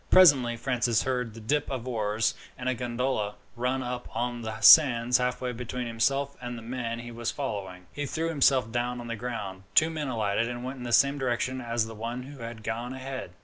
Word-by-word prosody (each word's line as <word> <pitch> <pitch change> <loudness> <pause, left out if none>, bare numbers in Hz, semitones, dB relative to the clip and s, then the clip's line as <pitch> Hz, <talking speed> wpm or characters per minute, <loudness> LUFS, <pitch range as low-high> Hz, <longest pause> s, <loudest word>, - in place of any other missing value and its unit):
Presently 135 -10 +6
Francis 120 -3 +1
heard 125 -4 -2
the - - -8
dip 145 +7 0
of 130 -2 -4
oars, 110 -2 0 0.2
and 125 - -5
a 130 - +2
gondola 120 -3 -2 0.2
ran 125 +2 -1
up 125 0 -4
on 120 +1 -2
the 110 -1 -5
sands 125 -1 +7
halfway 125 0 -1
between 125 +1 -4
himself 135 +5 0
and 120 -1 -5
the 115 - -9
man 115 -1 -3
he 120 0 -7
was 115 0 -3
following. 95 -9 -5
He 145 -1 -3
threw 165 +3 -2
himself 135 -6 +3
down 120 +1 -1
on 120 - -7
the 115 - -2
ground. 105 -5 -5
Two 160 +1 +5
men 155 -3 -3
alighted, 115 -2 0
and 120 0 -5
went 130 +2 -5
in 125 - -8
the 120 - -4
same 140 +4 +4
direction 130 0 -1
as 115 -1 0
the 115 - -8
one 115 +3 -5
who 140 +1 -11
had 115 -1 -7
gone 115 +3 -3
ahead. 130 -7 -6
120 Hz, 210 wpm, -28 LUFS, 115-130 Hz, 0.2 s, sands